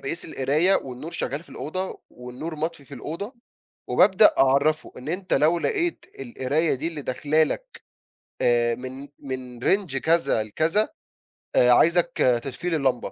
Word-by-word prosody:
باقيس 165 Hz, +6 st, -4 dB
القراية 155 Hz, +7 st, +2 dB
والنور 130 Hz, +5 st, -7 dB
شغال 145 Hz, -2 st, -4 dB
في -, -, -24 dB
الأوضة 185 Hz, +5 st, -5 dB
والنور 125 Hz, +7 st, -8 dB
مطفي 160 Hz, -1 st, -4 dB
في 140 Hz, -, -11 dB
الأوضة، 170 Hz, -, -6 dB, 0.5 s
وبابدأ 210 Hz, +1 st, +5 dB
أعَرَّفُه 140 Hz, +4 st, +2 dB
إن 130 Hz, +3 st, -9 dB
أنت 185 Hz, +3 st, -1 dB
لو 155 Hz, +5 st, +3 dB
لقيت 350 Hz, -, -1 dB, 0.2 s
القراية 160 Hz, -, 0 dB
دي 145 Hz, +5 st, -3 dB
اللي 155 Hz, -3 st, -6 dB
داخلة 150 Hz, +4 st, +1 dB
لك -, -, -3 dB, 0.6 s
آآ، 120 Hz, -1 st, +2 dB
من 130 Hz, +3 st, -8 dB
من 130 Hz, -3 st, -7 dB
range 190 Hz, -9 st, +1 dB
كذا 160 Hz, -6 st, +2 dB
لكذا 160 Hz, -, +1 dB, 0.7 s
آآ، 125 Hz, -, +5 dB
عايزك 170 Hz, +6 st, +4 dB, 0.3 s
تطفي 135 Hz, +6 st, -4 dB
لي 165 Hz, -, 0 dB
اللمبة، 130 Hz, -5 st, -1 dB
150 Hz, 145 wpm, -24 LUFS, 130-170 Hz, 0.7 s, وبابدأ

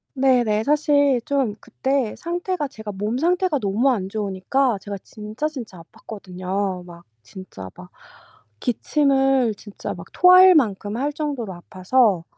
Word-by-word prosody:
네네. 245 Hz, -5 st, +2 dB
사실 285 Hz, -3 st, +2 dB
좀 270 Hz, -7 st, 0 dB
그때 265 Hz, -4 st, -2 dB
상태가 350 Hz, -2 st, -3 dB
제가 220 Hz, -4 st, -8 dB
몸 210 Hz, +5 st, -3 dB
상태가 355 Hz, -2 st, +1 dB
너무 215 Hz, +6 st, +1 dB
안 195 Hz, -5 st, -2 dB
좋으니까 210 Hz, +4 st, -1 dB
제가 200 Hz, -1 st, -6 dB
진짜 215 Hz, +8 st, -5 dB
진짜 230 Hz, -, -8 dB
아팠거든요. 185 Hz, -1 st, -5 dB
막 170 Hz, -1 st, -13 dB, 0.2 s
진짜 110 Hz, -, -10 dB
막 90 Hz, 0 st, -13 dB, 0.7 s
기침을 270 Hz, -2 st, +1 dB
진짜 205 Hz, 0 st, -7 dB
막 -, -, -11 dB
토할 365 Hz, 0 st, +7 dB
만큼 210 Hz, -5 st, 0 dB
할 290 Hz, +3 st, -2 dB
정도로 275 Hz, -10 st, -4 dB
아파서 185 Hz, +1 st, +1 dB
230 Hz, 265 characters per minute, -22 LUFS, 195-280 Hz, 0.7 s, 토할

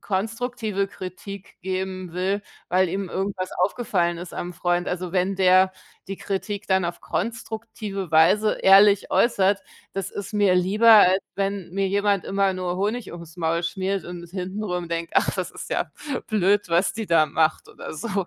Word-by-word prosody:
konstruktive 220 Hz, 0 st, -2 dB
Kritik 195 Hz, +1 st, -9 dB
geben 185 Hz, -1 st, -4 dB
will, 190 Hz, +3 st, -1 dB, 0.3 s
weil 185 Hz, 0 st, +3 dB
ihm 190 Hz, +1 st, -3 dB
irgendwas 190 Hz, -1 st, -3 dB
aufgefallen 180 Hz, -3 st, 0 dB
ist 175 Hz, 0 st, -8 dB
am 175 Hz, +1 st, -5 dB
Freund. 175 Hz, 0 st, 0 dB
Also, 180 Hz, 0 st, -4 dB
wenn 190 Hz, +1 st, +1 dB
der 185 Hz, 0 st, +5 dB, 0.4 s
die 195 Hz, -, -4 dB
Kritik 200 Hz, +1 st, -4 dB
dann 190 Hz, -2 st, +2 dB
auf 170 Hz, 0 st, -4 dB
konstruktive 220 Hz, -4 st, -4 dB
Weise 175 Hz, +7 st, +4 dB
ehrlich 200 Hz, +1 st, +6 dB
äußert, 200 Hz, -4 st, +3 dB, 0.3 s
das 195 Hz, -1 st, -4 dB
ist 205 Hz, +1 st, -7 dB
mir 200 Hz, -3 st, +4 dB
lieber, 210 Hz, +6 st, +4 dB
als 195 Hz, -3 st, +7 dB
wenn 195 Hz, -2 st, -2 dB
mir 195 Hz, +1 st, 0 dB
jemand 200 Hz, 0 st, +1 dB
immer 195 Hz, -1 st, +1 dB
nur 180 Hz, -1 st, -3 dB
Honig 215 Hz, +4 st, -2 dB
ums 170 Hz, 0 st, -10 dB
Maul 165 Hz, 0 st, 0 dB
schmiert 190 Hz, +2 st, -2 dB
und 175 Hz, -1 st, -8 dB
hintenrum 180 Hz, -1 st, -4 dB
denkt: 170 Hz, 0 st, -3 dB
„Ach, -, -, +3 dB
das -, -, -3 dB
ist -, -, -9 dB
ja -, -, -1 dB, 0.4 s
blöd, 205 Hz, -2 st, +2 dB
was 170 Hz, +3 st, +2 dB
die 220 Hz, -2 st, -5 dB
da 160 Hz, -2 st, +4 dB
macht", 155 Hz, +2 st, 0 dB
oder -, -, -9 dB
so. 195 Hz, +1 st, -3 dB
190 Hz, 165 wpm, -24 LUFS, 180-205 Hz, 0.4 s, als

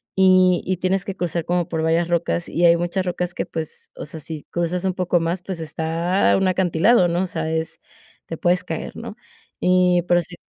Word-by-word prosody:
y 185 Hz, -1 st, +5 dB
y 185 Hz, 0 st, -1 dB
tienes 185 Hz, +2 st, 0 dB
que 195 Hz, -, -5 dB
cruzar 170 Hz, -2 st, -2 dB
como 175 Hz, -1 st, 0 dB
por 160 Hz, -1 st, -2 dB
varias 165 Hz, +1 st, +2 dB
rocas 170 Hz, 0 st, 0 dB
y 175 Hz, -, +1 dB
hay 170 Hz, 0 st, +6 dB
muchas 175 Hz, +2 st, -1 dB
rocas 180 Hz, 0 st, -2 dB
que, -, -, -2 dB
pues, 160 Hz, -1 st, -7 dB
o -, -, -7 dB
sea, 155 Hz, +2 st, -8 dB
si 155 Hz, 0 st, -8 dB
cruzas 175 Hz, +2 st, -2 dB
un 185 Hz, -, +1 dB
poco 180 Hz, -1 st, +1 dB
más, 170 Hz, +2 st, -2 dB
pues, 185 Hz, -3 st, -5 dB
está 165 Hz, +4 st, 0 dB
un 195 Hz, -1 st, +1 dB
acantilado, 185 Hz, +3 st, +3 dB
¿no?, 175 Hz, +2 st, 0 dB
o -, -, -2 dB
sea, 160 Hz, -2 st, -3 dB
es 160 Hz, 0 st, -3 dB, 0.5 s
te 165 Hz, -, -5 dB
puedes 180 Hz, +1 st, +1 dB
caer, -, -, -5 dB
¿no? -, -, -7 dB, 0.4 s
Y 180 Hz, -1 st, +3 dB
pero 175 Hz, 0 st, +4 dB
sí. 175 Hz, +1 st, -11 dB
175 Hz, 210 wpm, -21 LUFS, 165-185 Hz, 0.5 s, hay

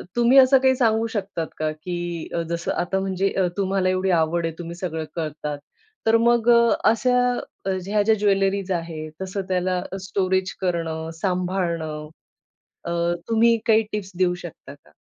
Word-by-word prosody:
तुम्ही 240 Hz, +2 st, +4 dB
असं 265 Hz, 0 st, +8 dB
काही 260 Hz, 0 st, +3 dB
सांगू 225 Hz, -2 st, +2 dB
शकतात 195 Hz, -7 st, -3 dB
का? 155 Hz, 0 st, -1 dB
की 175 Hz, +1 st, -5 dB, 0.2 s
जसं 170 Hz, 0 st, -2 dB
आता 185 Hz, +2 st, -1 dB
म्हणजे 190 Hz, 0 st, -1 dB, 0.2 s
तुम्हाला 190 Hz, -1 st, +1 dB
एवढी 185 Hz, +1 st, 0 dB
आवड 165 Hz, +1 st, 0 dB
आहे 165 Hz, -, -2 dB
तुम्ही 170 Hz, 0 st, -6 dB
सगळं 165 Hz, -3 st, -4 dB
करतात, 150 Hz, -2 st, -4 dB, 0.5 s
तर 225 Hz, 0 st, +5 dB
मग 235 Hz, 0 st, +3 dB
अ, 235 Hz, -1 st, +6 dB, 0.2 s
अशा 230 Hz, +3 st, +2 dB, 0.7 s
ह्या 210 Hz, +1 st, +2 dB
ज्या 220 Hz, +1 st, +4 dB
ज्वेलरीज 195 Hz, -1 st, +1 dB
आहेत 165 Hz, -3 st, -4 dB
तसं, 190 Hz, +1 st, -3 dB
त्याला 185 Hz, 0 st, 0 dB, 0.3 s
स्टोरेज 190 Hz, -1 st, 0 dB
करणं, 165 Hz, -3 st, -2 dB
सांभाळणं, 175 Hz, -5 st, -2 dB, 0.8 s
अ, 170 Hz, -, -3 dB, 0.4 s
तुम्ही 230 Hz, +1 st, +4 dB
काही 220 Hz, 0 st, +4 dB
टिप्स 200 Hz, -3 st, -4 dB
देऊ 180 Hz, -1 st, +2 dB
शकता 175 Hz, -5 st, -10 dB
का? 110 Hz, -, -26 dB
185 Hz, 145 wpm, -23 LUFS, 170-215 Hz, 0.8 s, असं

